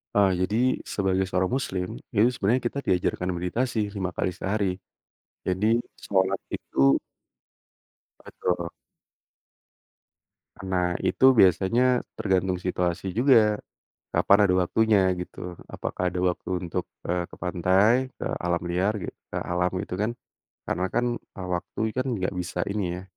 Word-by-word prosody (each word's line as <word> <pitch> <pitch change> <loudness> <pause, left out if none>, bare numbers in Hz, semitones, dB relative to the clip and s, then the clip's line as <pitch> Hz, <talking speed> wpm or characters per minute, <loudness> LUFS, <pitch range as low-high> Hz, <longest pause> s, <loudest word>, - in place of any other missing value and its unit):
Ah, 100 -2 +5
jadi 95 +3 0 0.4
sebagai 95 -1 +1
seorang 95 0 0
muslim, 95 -8 -2 0.3
itu 105 +3 +5
sebenarnya 120 +4 +1
kita 140 - -4
diajarkan 90 0 +1
meditasi 115 +8 -1 0.2
5 95 -2 -2
kali 95 - 0
sehari. 95 -2 -1 0.7
Jadi 95 +3 0 0.4
sholat 95 -1 +1 0.2
itu 70 0 +3 1.3
Betul. 85 -1 -2 2.0
Nah, 90 -2 0
itu 130 -1 +5
biasanya 120 +7 +4 0.2
tergantung 95 -3 +1
situasi 90 +1 -1
juga, 110 -3 +4 0.5
kapan 100 - +5
ada 90 -2 +3
waktunya 110 +3 +3 0.2
gitu. 90 0 -7 0.2
Apakah 90 -1 -2
ada 90 - -2
waktu 90 - -4 0.2
untuk, - - -2 0.2
eee, 90 0 0
ke - - -12
pantai, 95 +8 +3
ke - - -3
alam 85 -1 0
liar 90 +4 +1
gitu, - - -6 0.2
ke - - -3
alam 90 +1 0
gitu 100 - -5
kan. 105 +2 +1 0.6
Karena 90 - 0
kan, 120 +1 +2
eee, 95 -2 -9
waktu 85 - -6 0.2
kan 130 - 0
enggak 95 -2 -1
bisa 90 0 -4
ini 100 0 -1 0.2
ya, - - -12
95 Hz, 130 wpm, -26 LUFS, 90-105 Hz, 2.0 s, Ah